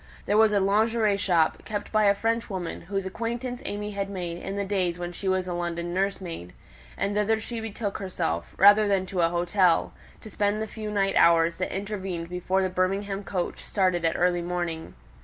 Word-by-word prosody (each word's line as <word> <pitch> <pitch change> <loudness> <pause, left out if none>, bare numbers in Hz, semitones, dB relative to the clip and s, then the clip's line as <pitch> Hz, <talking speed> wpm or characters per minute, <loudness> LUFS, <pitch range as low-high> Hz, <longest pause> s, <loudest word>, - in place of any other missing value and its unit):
There 205 - +1
was 220 0 +6
a 205 - +3
"lingerie" 215 +2 +2
shop, 175 -5 +1
kept 205 -1 -5
by 215 -1 +3
a 200 0 +5
Frenchwoman, 210 -5 -2
whose 195 -1 -1
acquaintance 235 +5 -4
AimÄe 210 0 -4
had 200 0 -3
made 175 -3 -4
in 195 - -4
the 200 0 -1
days 185 -3 0
when 175 0 -4
she 190 +3 -6
was 185 -1 +1
a 180 - -2
London 175 0 -3
nursemaid, 185 - -3 0.4
and 200 - -1
thither 210 +2 +2
she 230 +1 -5
betook 220 -2 -4
herself, 175 - -3
rather 205 +2 +7
than 195 -2 +1
to 185 -1 -2
an 165 - +4
hotel, 175 +1 +2 0.3
to 220 - -10
spend 205 +2 0
the 220 - -1
few 215 0 -6
night 195 -2 +1
hours 170 0 +5
that 185 - -2
intervened 190 -4 -4
before 185 +2 0
the - - +2
Birmingham 195 +2 -1
coach 185 -3 -3
started 185 -4 +1
at 165 - +1
early 175 0 +2
morning. 175 -2 -4
195 Hz, 195 wpm, -26 LUFS, 175-205 Hz, 0.4 s, rather